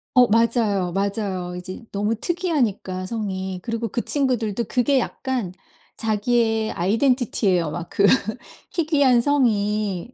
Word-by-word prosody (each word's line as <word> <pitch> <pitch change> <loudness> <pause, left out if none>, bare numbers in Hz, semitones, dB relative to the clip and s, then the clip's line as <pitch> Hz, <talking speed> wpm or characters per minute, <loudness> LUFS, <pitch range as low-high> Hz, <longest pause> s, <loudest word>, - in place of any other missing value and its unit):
어. 250 -1 +7
맞아요, 215 -5 +2
맞아요. 195 -3 -2
이제 185 +5 -7
너무 210 +3 0
특이하니까 240 - -1
성이 190 -3 -4
그리고 230 0 -2
그 235 - -2
친구들도 240 -6 0
그게 260 +2 +2
약간 245 -6 -3 0.5
자기의 225 0 +1
아이덴티티예요 200 - +1
막 175 +1 -6
그 200 - +2 0.7
희귀한 285 -7 +3
성이. 215 -5 0
220 Hz, 280 characters per minute, -22 LUFS, 195-245 Hz, 0.7 s, 어